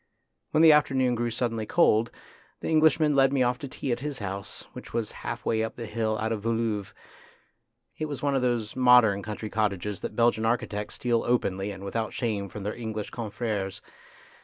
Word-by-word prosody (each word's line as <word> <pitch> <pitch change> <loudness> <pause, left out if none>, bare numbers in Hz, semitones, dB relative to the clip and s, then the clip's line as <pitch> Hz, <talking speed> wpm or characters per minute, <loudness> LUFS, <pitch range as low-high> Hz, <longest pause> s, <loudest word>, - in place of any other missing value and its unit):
When 155 - +3
the 160 - +9
afternoon 130 -4 +3
grew 120 0 -1
suddenly 115 -2 -2
cold, 115 -9 +3 0.5
the - - -4
Englishman 155 -1 +4
led 135 -1 +5
me 135 -2 +2
off 125 0 0
to 140 - -6
tea 130 0 -4
at 120 - 0
his 145 0 -4
house, 100 -2 -6
which - - -10
was 115 -2 -1
half - - -6
way 110 -1 +1
up 110 - -4
the 120 - -6
hill 110 0 -1
out 110 +1 -2
of 105 -2 -3
Woluwe. 115 -3 -1 1.1
It 155 - -1
was 145 -2 -6
one 140 -1 +2
of 135 - +2
those 120 -3 -1
modern 125 -6 +5
country 105 +1 -6
cottages 105 -2 -1
that - - -6
Belgian 115 -1 +3
architects 110 -3 -1
steal 120 -2 0
openly 100 -5 0
and 100 -1 -7
with 100 - -6
out 115 -1 -1
shame 105 -5 -2
from 105 - -7
their 105 +2 -2
English 110 -3 -5
confreres. 105 -4 -3
115 Hz, 195 wpm, -27 LUFS, 105-125 Hz, 1.1 s, the